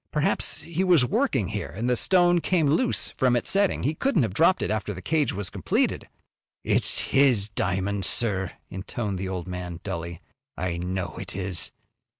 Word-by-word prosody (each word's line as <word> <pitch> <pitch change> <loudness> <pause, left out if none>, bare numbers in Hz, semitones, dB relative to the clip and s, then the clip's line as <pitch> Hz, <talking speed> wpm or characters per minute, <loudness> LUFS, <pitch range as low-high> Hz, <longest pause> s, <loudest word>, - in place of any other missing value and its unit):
Perhaps 150 0 0
he 170 +2 -2
was 175 -9 +4
working - - 0
here, 70 - -4
and 110 +11 -4
the 125 - +2
stone 175 +4 +3
came 170 -3 +1
loose 160 - +1
from 125 -2 +1
its 120 - 0
setting. 200 0 +2
He 150 - +1
couldn't 190 - +1
have 110 -5 -2
dropped 170 - +3
it - - -1
after 105 -1 -2
the - - -7
cage 155 -2 +1
was 95 -1 -4
completed." - - -1 0.5
"It's - - +3
his 125 -7 +4
diamond, 95 0 -1
sir," 95 -5 +2 0.2
intoned 95 +1 -4
the 95 0 -3
old 90 -1 -4
man, 90 -2 -6
dully. 85 -2 -5 0.3
"I 90 -2 -2
know 90 -1 -4
it - - -6
is." 95 -3 -2
105 Hz, 175 wpm, -25 LUFS, 95-150 Hz, 0.5 s, was